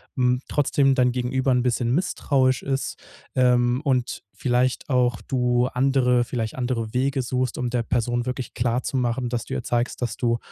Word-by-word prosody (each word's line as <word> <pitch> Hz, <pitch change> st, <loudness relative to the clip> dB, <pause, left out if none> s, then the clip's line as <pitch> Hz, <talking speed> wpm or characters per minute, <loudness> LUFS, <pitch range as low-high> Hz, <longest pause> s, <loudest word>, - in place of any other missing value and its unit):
hm, 125 Hz, -1 st, +2 dB
trotzdem 140 Hz, -1 st, +2 dB
dein 125 Hz, -1 st, +3 dB
Gegenüber 130 Hz, +2 st, 0 dB
'n 125 Hz, -1 st, +3 dB
bisschen 120 Hz, -1 st, 0 dB
misstrauisch 135 Hz, -6 st, +1 dB
ist, 135 Hz, 0 st, -2 dB, 0.4 s
ähm, 125 Hz, 0 st, +3 dB
und 130 Hz, -4 st, -1 dB
vielleicht 125 Hz, 0 st, 0 dB
auch 125 Hz, -3 st, +2 dB
du 125 Hz, -2 st, +1 dB
andere 125 Hz, -1 st, +2 dB
vielleicht 115 Hz, -2 st, -3 dB
andere 120 Hz, -3 st, -2 dB
Wege 135 Hz, +2 st, +1 dB
suchst, 125 Hz, 0 st, -2 dB
um 125 Hz, -1 st, -1 dB
der 120 Hz, -1 st, -1 dB
Person 120 Hz, +1 st, -1 dB
wirklich 125 Hz, 0 st, -4 dB
klarzumachen, 125 Hz, +1 st, -1 dB
dass 120 Hz, -1 st, -2 dB
du -, -, -6 dB
ihr -, -, -3 dB
zeigst, 120 Hz, +1 st, -1 dB
dass 120 Hz, -3 st, -2 dB
du 115 Hz, -1 st, +1 dB
125 Hz, 165 wpm, -24 LUFS, 120-130 Hz, 0.4 s, dein